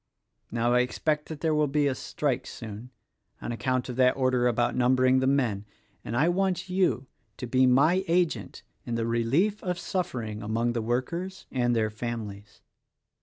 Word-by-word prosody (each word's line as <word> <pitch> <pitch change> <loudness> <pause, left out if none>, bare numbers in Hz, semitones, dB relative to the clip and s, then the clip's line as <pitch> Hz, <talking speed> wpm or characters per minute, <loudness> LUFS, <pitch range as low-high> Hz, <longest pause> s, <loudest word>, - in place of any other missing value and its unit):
Now, 120 +1 +1
I 125 - +5
expect 150 +4 0
that 155 -2 -7
there 160 -1 +1
will 150 -1 +2
be 145 +1 +1
a 140 - +2
strike 140 +1 -2
soon 110 +1 -8 0.3
— - - -47
on - - -5
account 130 +1 -1
of 125 -1 -6
that 125 0 +4
order 130 -2 +2
about 120 0 +1
number 130 +1 +3
ing 130 +1 +5
the 130 - +1
men 125 -8 +1 0.2
— - - -39
and 115 - -3
I 150 +6 +4
want 185 0 0
you 180 -8 +1 0.3
to - - -5
be 130 +2 +3
my 155 +9 +4
agent 170 0 0 0.2
in 120 - -3
the 115 -1 -1
relief 130 - +1
of 180 -1 -2
suffering 120 - -3
among 115 +3 0
the 115 - -1
workers 170 +12 -3
and 120 -1 +1
their 110 -1 +1
families. 105 -3 -6
125 Hz, 185 wpm, -27 LUFS, 115-150 Hz, 0.3 s, I